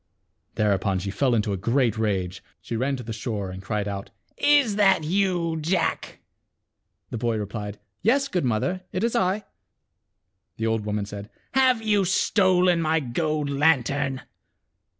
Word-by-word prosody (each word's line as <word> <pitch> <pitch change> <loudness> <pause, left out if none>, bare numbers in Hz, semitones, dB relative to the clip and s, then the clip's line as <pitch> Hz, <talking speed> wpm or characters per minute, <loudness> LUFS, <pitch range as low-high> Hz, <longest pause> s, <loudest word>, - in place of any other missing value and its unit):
Thereupon 100 -2 +1
she 100 +2 -3
fell 125 +3 +1
into 105 -2 0
a - - -2
great 115 +3 +1
rage. 95 -5 -2 0.2
She 115 - -5
ran 135 +4 0
to 125 - -7
the 115 0 -5
shore, 105 -4 -4
and 95 +1 -8
cried 105 0 -2
out 100 -1 -5 0.3
" - - -53 0.3
Is 215 -5 -3
that 195 -5 +4
you, 175 -1 0
Jack? 175 +4 -1 0.5
" - - -53
The 115 - -3
boy 115 -1 0
replied, 105 0 -5 0.2
"Yes, 275 +6 +3
good 180 - -1
mother, 130 +10 0
it 185 - -2
is 235 - 0
I." 190 +3 +1 1.1
The 110 - -2
old 110 -2 -1
woman 105 -1 -1
said, 100 0 -8 0.2
"Have 260 -4 +3
you 210 -2 +3
stolen 185 -2 +3
my 160 0 +2
gold 150 +2 -1
lan 140 -1 +4
tern?" 135 0 -2
135 Hz, 165 wpm, -25 LUFS, -, 1.1 s, that